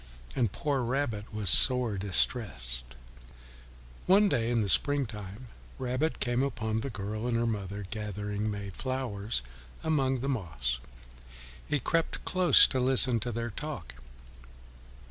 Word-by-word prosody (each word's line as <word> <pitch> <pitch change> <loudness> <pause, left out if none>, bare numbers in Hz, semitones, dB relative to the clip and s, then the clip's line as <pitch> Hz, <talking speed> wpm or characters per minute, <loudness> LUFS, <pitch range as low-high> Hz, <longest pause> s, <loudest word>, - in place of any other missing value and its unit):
And 115 -6 0
poor 140 +2 -2
Rabbit 120 -4 -3
was 105 -5 +5
sore 125 - +7
distressed. 90 - -2 1.1
One 195 +3 +5
fine 205 - +3
day 115 -7 0
in 120 -2 +1
the 105 - -1
spring 145 +7 +3
time, 105 +2 -10 0.3
Rabbit 130 +5 -2
came 120 0 0
upon 110 -5 -2
the 140 - -4
girl 110 +1 -5
and 120 -1 0
her 120 - 0
mother 100 -3 -4
gathering 105 -1 -4
May 100 -1 -6
flowers 115 - -4 0.4
among 135 -5 0
the 135 - -3
moss. 70 - -3 0.9
He 150 - 0
crept 165 +6 -2
close 185 -1 +6
to 130 - -1
listen 130 -1 +4
to 120 +3 -3
their 115 +1 -4
talk. 145 - -7
115 Hz, 140 wpm, -29 LUFS, 105-130 Hz, 1.1 s, sore